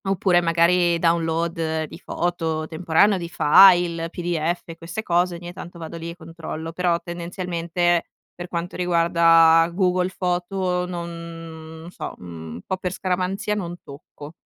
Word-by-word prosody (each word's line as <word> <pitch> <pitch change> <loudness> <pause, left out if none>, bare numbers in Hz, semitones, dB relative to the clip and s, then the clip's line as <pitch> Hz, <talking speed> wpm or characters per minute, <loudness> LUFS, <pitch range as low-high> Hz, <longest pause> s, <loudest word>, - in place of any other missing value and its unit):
Oppure 185 -2 +2
magari, 170 +1 +3
download 165 -1 0
di 155 - -9
foto 165 -4 -2
temporanee 170 +5 +2
o - - -5
di 170 -1 -6
file, 170 0 +5
p-d-f 170 -1 -3
queste 170 +6 -6
cose, 175 -1 +1
ogni 175 +1 -8
tanto 175 0 -10
vado 165 0 -7
lì 165 0 -6
e 170 - -7
controllo. 165 -1 -7
Però 170 0 0
tendenzialmente, 175 0 -1 0.3
per 175 0 -8
quanto 175 0 -4
riguarda 165 -1 +5
Google 180 0 +1
Foto 180 0 -1
non 165 -2 -8
n - - -9
so, - - -7
un 80 -1 -9
po' 190 - -2
per 180 -1 -4
scaramanzia 185 +2 -1
non 175 -4 -4
tocco. 145 +1 -12
170 Hz, 140 wpm, -23 LUFS, 165-180 Hz, 0.3 s, file